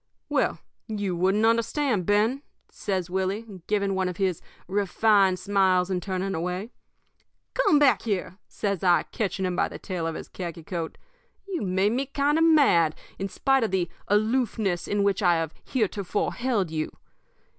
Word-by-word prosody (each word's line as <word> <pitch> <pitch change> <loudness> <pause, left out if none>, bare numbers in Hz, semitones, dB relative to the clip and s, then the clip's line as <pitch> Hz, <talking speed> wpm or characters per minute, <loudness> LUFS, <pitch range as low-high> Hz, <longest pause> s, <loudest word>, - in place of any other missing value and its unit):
"'Well, - - +1 0.3
you 205 -5 -2
wouldn't 190 +5 +2
understand, 230 - +1
Ben,' 220 +6 +2 0.3
says 185 -3 -3
Willie, 190 +1 -3
giving 200 -2 +1
one 190 -1 0
of 180 - -6
his 190 -4 0 0.3
refined 200 0 +3
smiles 190 -1 +2
and 180 -1 0
turning 190 0 -2
away. 180 +7 -3 0.8
"'Come - - +4
back 285 -2 +4
here!' 195 -3 -3
says 200 -4 -3
I, 175 -2 +4
catching 195 -3 -2
him 180 -1 -1
by - - +2
the - - -8
tail 180 -4 -4
of 165 - -3
his - - -7
khaki 170 -3 -7
coat. 170 -2 -5 0.5
'You've 350 - -3
made 190 +3 +2
me 260 +3 -1
kind 285 +3 +1
of - - +4
mad, 270 - +5 0.2
in 195 0 -2
spite 270 +6 +2
of 220 - 0
the 180 -3 -1 0.2
aloofness 215 -4 +1
in 205 0 +1
which 200 -1 +1
I 175 -3 +4
have 165 -1 -2
heretofore 210 -4 -1
held 230 -9 -1
you. 155 -1 -3
195 Hz, 165 wpm, -26 LUFS, 180-220 Hz, 0.8 s, mad